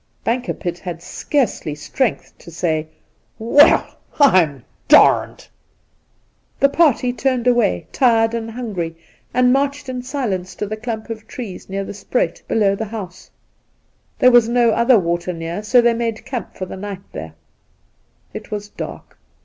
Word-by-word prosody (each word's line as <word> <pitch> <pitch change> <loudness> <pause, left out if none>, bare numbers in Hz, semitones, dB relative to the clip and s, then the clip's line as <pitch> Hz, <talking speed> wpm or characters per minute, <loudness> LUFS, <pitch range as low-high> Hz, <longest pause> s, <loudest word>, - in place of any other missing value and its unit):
Bankerpitt 225 -7 -2
had 170 -2 -7
scarcely 235 - -1
strength 225 - -2
to - - -13
say, 160 -2 -1 0.3
' - - -43
Well, 235 +6 +4 0.2
I'md 170 - +4 0.2
d!' - - +5 1.2
The 275 - +5
party 275 -5 +2
turned 250 0 -1
away, 240 - +2
tired 230 -3 +3
and 225 -1 -3
hungry, 200 -9 -5 0.3
and 250 0 +3
marched 280 0 -1
in 250 -1 -4
silence 235 -9 -3
to - - -3
the 215 +1 -4
clump 220 0 -5
of 220 -1 -8
trees 225 -8 -8
near 195 +1 -3
the - - -7
spruit 205 +5 -2
below 205 -3 +2
the 220 - -4
house. 200 -5 -8 0.9
There 255 - +5
was 240 -2 +5
no 240 -1 +3
other 235 +2 +4
water 175 -1 -1
near, 165 +3 -5
so 240 +4 +4
they 235 0 +3
made 230 -1 -3
camp 250 -7 -6
for 185 - -5
the 185 - -8
night 195 -1 -7
there. 80 0 -7 1.0
It - - -8
was 205 -1 -5
dark. - - -9
220 Hz, 150 wpm, -19 LUFS, 185-245 Hz, 1.2 s, d